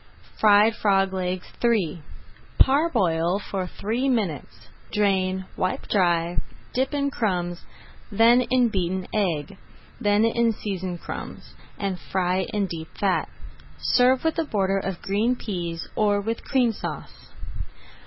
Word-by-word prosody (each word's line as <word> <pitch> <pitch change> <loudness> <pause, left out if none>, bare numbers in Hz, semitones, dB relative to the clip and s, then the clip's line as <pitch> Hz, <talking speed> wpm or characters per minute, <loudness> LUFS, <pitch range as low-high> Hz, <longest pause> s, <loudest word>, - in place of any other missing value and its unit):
FRIED 215 +1 +5
FROG 195 -2 +2
LEGS 185 -1 -2 0.2
III 195 -9 +1 0.6
Parboil 195 - +3
for 195 -2 -4
three 235 +9 -2
minutes, 200 - -2 0.2
drain, 190 -3 +1
wipe 185 - -2
dry, 175 -3 +2 0.3
dip 260 +1 0
in 280 -1 0
crumbs, 180 -8 -2 0.5
then 230 +4 +5
in 250 -1 +3
beaten 185 -2 -1
egg, 190 -3 -1 0.4
then 205 +1 +3
in 230 0 +2
seasoned 185 -4 -4
crumbs, - - -8 0.2
and 195 -3 -2
fry 185 0 -1
in 205 -1 0
deep 165 -3 -6
fat. 195 -2 +1 0.5
Serve 255 +1 +3
with 320 0 0
a - - +2
border 195 -8 0
of 190 -2 -5
green 215 +6 +1
peas, 175 -8 -4
or 205 -1 +2
with 225 +3 -3
Cream 250 -4 +2
Sauce. 220 - -7
200 Hz, 125 wpm, -24 LUFS, 185-230 Hz, 0.6 s, FRIED